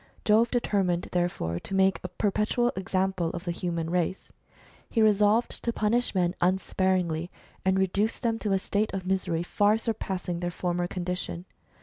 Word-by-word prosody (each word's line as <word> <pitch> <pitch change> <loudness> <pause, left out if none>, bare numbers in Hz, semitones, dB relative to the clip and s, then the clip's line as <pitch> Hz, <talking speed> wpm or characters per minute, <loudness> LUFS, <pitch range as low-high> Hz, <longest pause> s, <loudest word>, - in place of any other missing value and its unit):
Jove 225 +2 +4
determined 195 -7 0
therefore. 175 - -1
to 195 - -5
make 190 0 +3
a - - -2
perpetual 215 +4 +1
example 190 -2 0
of 170 - -5
the 175 - -2
human 170 -2 -3
race. 180 +1 -1 0.6
He 230 - -1
resolved 215 +1 +3
to 235 - +1
punish 230 +1 0
men 175 -1 +2
unsparingly, 180 -2 +1 0.3
and 190 0 +2
reduce 200 +4 +1
them 230 -2 -1
to 210 - -2
a - - +4
state 205 +3 -1
of 190 -1 -4
misery 185 -3 0
far 205 +4 +3
surpassing 190 -6 -3
their 175 0 -2
former 175 0 -1
condition. 180 -1 -4
190 Hz, 155 wpm, -27 LUFS, 175-210 Hz, 0.6 s, Jove